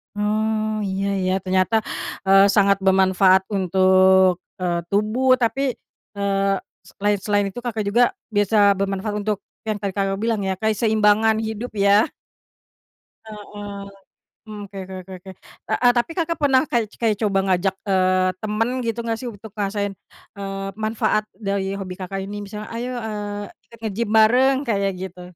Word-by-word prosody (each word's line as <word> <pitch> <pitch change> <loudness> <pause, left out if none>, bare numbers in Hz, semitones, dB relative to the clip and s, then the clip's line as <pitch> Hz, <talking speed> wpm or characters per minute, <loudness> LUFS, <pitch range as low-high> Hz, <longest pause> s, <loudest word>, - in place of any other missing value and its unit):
Oh 215 +1 0
iya 195 0 -2 0.2
ya, 185 - +1
ternyata, 190 +4 +1 0.4
eee, 195 +1 +6
sangat 200 -1 +4
bermanfaat 190 0 +4
untuk, 190 -1 +4 0.2
eee, 175 -1 0
tubuh 215 +8 +2
tapi, 260 +2 +1 0.4
eee, 195 -1 0 0.3
s - - -16
selain 205 0 0
selain 205 +1 0
itu 190 - -14
Kakak 225 -2 -2
juga 230 +4 +2 0.2
biasa 205 -1 +3
bermanfaat 195 +2 -2
untuk 210 -2 -1 0.2
yang 215 -2 -3
tadi 200 - -1
Kakak 195 0 -1
bilang 225 -3 0
ya, 190 - 0
keseimbangan 220 +1 +2
hidup 220 +2 -5
ya. 200 +1 +3 1.1
Heeh. 205 -2 -8 0.6
Mmm, 210 -1 -7
oke 200 0 -12
oke 190 +1 -10
oke 190 - -13
oke. 190 0 -10 0.4
Heeh, 245 -1 +4
tapi 240 +7 0
Kakak 335 -1 -1
pernah 270 -2 +4
ka 245 - 0 0.2
kayak 220 -2 +2
coba 200 -3 +2
ngajak, 190 +1 +1
eee, 185 -1 +2
temen 215 +2 -1
gitu 230 0 -2
nggak 225 -1 -1
sih 250 - -5
untuk 215 -1 -11
ngerasain, 205 -1 -2 0.4
eee, 195 -1 -5
manfaat 215 0 0
dari 195 -2 -2
hobi 185 -2 -5
Kakak 190 +1 -5
ini, 205 +1 -6
misalnya, 210 +1 -8
"Ayo, 240 +2 -4
eee, 210 -2 -4 0.3
ikut 230 - -16
nge-gym 215 +1 -2
bareng," 250 +5 +5
kayak 200 -3 +1
gitu? 185 -1 -7
205 Hz, 150 wpm, -22 LUFS, 195-220 Hz, 1.1 s, eee